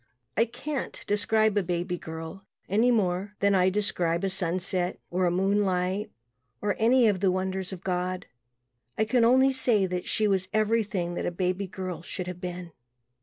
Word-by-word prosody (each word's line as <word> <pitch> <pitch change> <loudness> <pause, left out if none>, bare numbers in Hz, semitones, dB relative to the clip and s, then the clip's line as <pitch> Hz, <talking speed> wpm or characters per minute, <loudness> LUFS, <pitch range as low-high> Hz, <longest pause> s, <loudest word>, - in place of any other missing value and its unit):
I 230 - +4
can't 275 +4 -5
describe 215 +1 +2
a 205 - +3
baby 180 0 -2
girl 160 +3 -8 0.2
any 220 +5 +3
more 200 -3 0
than 200 0 +3
I 185 -1 +4
describe 180 -4 0
a 195 - 0
sunset 185 0 -1
or 180 0 +2
moonlight 190 +1 +1 0.5
or 205 - 0
any 235 +2 +5
of 200 -3 +2
the 195 0 +3
wonders 190 +1 -2
of 190 -1 -8
God 180 0 -2 0.7
I 220 - +2
can 235 +2 +2
only 260 +3 +5
say 240 -6 +3
that 180 -1 -3
she 215 - +1
was 190 -2 +1
everything 215 -5 +1
that - - -2
a - - -1
baby 185 +2 -1
girl 185 -3 -5
should 180 +1 -5
have 180 0 -7
been. 180 -1 -6
190 Hz, 170 wpm, -27 LUFS, 180-210 Hz, 0.7 s, any